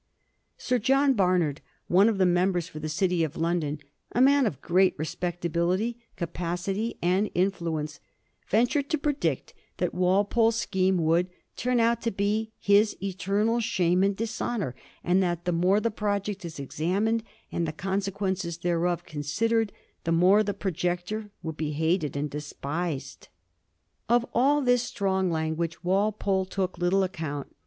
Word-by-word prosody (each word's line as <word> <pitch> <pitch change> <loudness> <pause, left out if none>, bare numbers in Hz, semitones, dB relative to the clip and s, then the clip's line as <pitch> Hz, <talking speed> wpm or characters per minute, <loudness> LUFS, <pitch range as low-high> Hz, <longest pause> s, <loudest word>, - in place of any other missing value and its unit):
Sir 250 -1 0
John 270 +4 +3
Barnard, 180 - +1 0.3
one 195 +5 +5
of 220 - -1
the 190 - +4
members 180 -1 +2
for 155 - -9
the 155 +1 -4
City 175 +2 +1
of 155 0 -3
London, 165 -3 0 0.4
a - - +1
man 275 0 +5
of 140 - -4
great 185 +4 +3
respectability, 175 +6 -1 0.2
capacity, 180 +6 -3
and 185 +4 +2
influence, 165 -5 -1 0.5
ventured 245 +6 +2
to 315 - +1
predict 290 0 -1 0.2
that - - -1
Walpole's 200 +5 +2
scheme 190 -4 +1
would 170 +2 +2
' - - -48
turn 250 0 +1
out 230 0 +2
to 230 - 0
be 210 +2 -1
his 205 +1 +3
eternal 200 +4 0
shame 180 -5 +2
and 195 +1 +2
dishonour, 220 - -2 0.3
and 180 +2 +3
that 175 -2 -1
the 180 - +1
more 180 +4 +3
the 230 +1 0
project 205 -1 -2
is 160 -3 -7
examined 190 +11 0 0.3
and 170 -1 -1
the - - -2
consequences 190 -1 -2
thereof 175 0 0
considered, 215 +9 0 0.3
the 165 - -1
more 180 +5 +5
the 205 -1 -2
projector 180 +3 -2
will 160 -1 -3
be 150 -1 -3
hated 160 -1 0
and 145 0 -2
despised.' 150 +1 -4 0.8
Of 240 0 +4
all 285 +4 +3
this 245 -1 +4
strong 190 -5 0
language 160 +1 -2
Walpole 195 0 +1
took 185 -2 -3
little 180 +2 +3
account. 155 -6 -5
185 Hz, 145 wpm, -27 LUFS, 170-210 Hz, 0.8 s, one